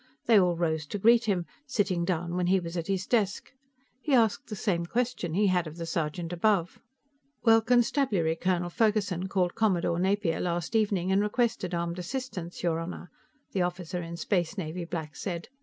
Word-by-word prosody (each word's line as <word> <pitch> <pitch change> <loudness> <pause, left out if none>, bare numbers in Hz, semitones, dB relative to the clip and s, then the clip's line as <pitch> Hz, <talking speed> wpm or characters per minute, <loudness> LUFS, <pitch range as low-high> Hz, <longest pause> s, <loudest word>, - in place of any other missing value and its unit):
They 225 -3 +6
all 180 -2 +3
rose 160 -3 -1
to 205 - -4
greet 230 +3 +5
him, 185 -5 0 0.2
sitting 195 -8 0
down 175 -1 -1
when 180 -1 0
he 190 +1 +4
was 170 -1 -6
at 170 -2 -3
his 190 -1 -1
desk. 205 -5 0 0.5
He 285 -2 +2
asked 230 +4 +2
the 215 - -5
same 175 -5 -1
question 235 -7 -1
he 205 +2 +3
had 180 -3 +2
of 155 +2 -9
the 170 - -4
sergeant 165 +1 -3
above. 180 -1 +1 0.6
"Well, 225 -1 +6
Constabulary 225 - +2
Colonel 175 0 -1
Ferguson 205 -4 +1
called 185 -2 0
Commodore 180 -6 +1
Napier 190 -2 +1
last 175 +4 -2
evening 200 -4 +1
and 195 +1 +4
requested 210 -4 0
armed 170 +1 -2
assistance, 180 -4 -5
your 165 -2 +1
Honor," 175 +1 -7 0.4
the 190 - 0
officer 175 0 -2
in 170 0 -6
Space 175 +1 -1
Navy 170 -1 -4
black 160 -3 -5
said. 170 -3 -5
180 Hz, 180 wpm, -28 LUFS, 170-210 Hz, 0.6 s, They